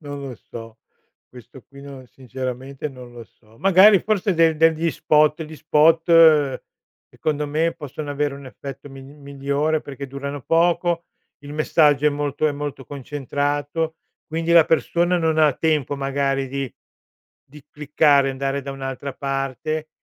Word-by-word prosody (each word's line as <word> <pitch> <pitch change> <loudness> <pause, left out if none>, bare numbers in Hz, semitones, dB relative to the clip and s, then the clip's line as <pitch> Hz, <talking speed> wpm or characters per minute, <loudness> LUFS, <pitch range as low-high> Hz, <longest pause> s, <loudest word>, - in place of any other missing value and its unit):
non 145 -2 -7
lo 135 -3 -7
so, 115 0 -11 0.5
questo 125 +1 -15
qui, 140 0 -14
no 135 -2 -11
sinceramente, 130 +3 -6
non 125 -3 -12
lo 120 -1 -10
so. 110 0 -26
Magari, 195 +3 +6
forse 205 -2 0
de 165 -1 +3
degli 165 +1 +2
spot 150 +1 +2
gli 155 0 -9
spot, 160 -2 +4 0.5
secondo 150 -1 -2
me, 160 +3 0
possono 150 -1 -8
avere 145 0 -1
un 140 -1 -11
effetto 135 +2 -10
mi 135 -1 -11
migliore, 140 +2 -3
perché 140 0 -8
durano 140 +1 -6
poco, 170 0 +1 0.4
il 145 0 -10
messaggio 150 -1 +2
è - - +7
molto 145 +1 -2
è 150 - 0
molto 145 -2 -6
concentrato, 145 +3 -3 0.3
quindi 165 +1 -3
la 165 -2 +7
persona 175 +2 +1
non 160 -1 0
ha 150 -3 +5
tempo, 150 -2 -1
magari, 135 -1 -1
di 135 -1 -4 0.8
di 145 0 -15
cliccare, 145 -2 +2
andare 135 +1 -3
da 140 - -6
un'altra 135 0 -6
parte 140 +3 -3
145 Hz, 145 wpm, -21 LUFS, 135-155 Hz, 0.8 s, è